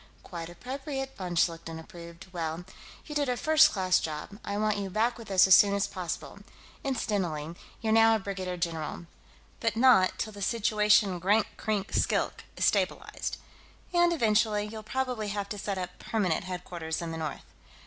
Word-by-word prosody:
"Quite 170 -2 -7
appropriate," 270 - -5
von 180 -3 -5
Schlichten 165 -1 0
approved. 170 +1 -11
"Well, 165 0 -3 0.4
you 300 - -7
did 290 -3 0
a 250 - 0
first 315 +2 +5
class 185 -2 +2
job. 155 +6 -6
I 200 - -3
want 215 0 +1
you 200 -1 -3
back 225 +5 +1
with 225 -3 -11
us 190 -1 +6
as 190 - +6
soon 200 +1 +7
as 200 - +1
possible 180 -3 -5 0.4
incidentally, 180 - -2 0.3
you're 220 -1 +1
now 225 0 +6
a - - 0
brigadier 190 -2 -4
general 165 -1 -3 0.5
but 230 -2 0
not 230 -6 +5
till 215 - -3
the 205 - -10
situation 210 -2 +3
at 175 - -6
Grank 205 +4 +3
Krink 210 -2 -2
Skilk - - 0
is - - +2
stabilized. - - 0 0.6
And, 345 0 +4
eventually, 215 -7 +2
you'll 215 +1 -7
probably 250 -1 -2
have 200 -1 -3
to 205 - -5
set 195 0 -3
up 180 -1 -5
permanent 185 -7 -1
headquarters 175 -3 -4
in 170 -1 -4
the 160 - -4
north." 155 -1 -5
200 Hz, 175 wpm, -29 LUFS, 175-225 Hz, 0.6 s, soon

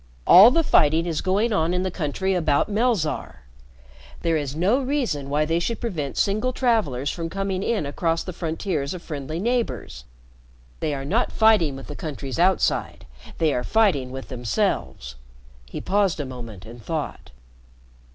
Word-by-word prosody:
All 195 +6 +9
the 330 +6 +2
fighting 160 - +3
is 165 -3 -2
going 205 +5 +1
on 170 -1 +1
in 180 - 0
the 185 - -2
country 185 +4 -2
about 160 0 +1
Melzarr. 205 - -1 0.8
There 165 -1 +2
is 145 -2 -2
no 195 - +2
reason 250 - -2
why 150 +2 +1
they 165 +2 0
should 230 +6 -2
prevent 160 - -4
single 215 +6 +1
travelers 190 - 0
from 165 -1 -4
coming 195 +1 -2
in 210 -6 -1
across 165 +3 -1
the 185 - -6
frontiers 165 -2 -3
of 175 - -9
friendly 150 0 -5
neighbors. 195 - -2 0.7
They're 140 -3 -2
not 215 - 0
fighting 215 -11 +3
with 135 - -9
the 145 - -8
countries 140 -3 -5
outside, 185 +2 +1 0.3
they 160 -3 +2
are 125 - -1
fighting 185 - +2
with 130 +1 -8
themselves." 105 - -2 0.5
He - - -5
paused 195 -4 +1
a 145 - -2
moment 115 -7 -9
and 115 0 -12
thought. 155 +1 -4
165 Hz, 160 wpm, -23 LUFS, 140-200 Hz, 0.8 s, All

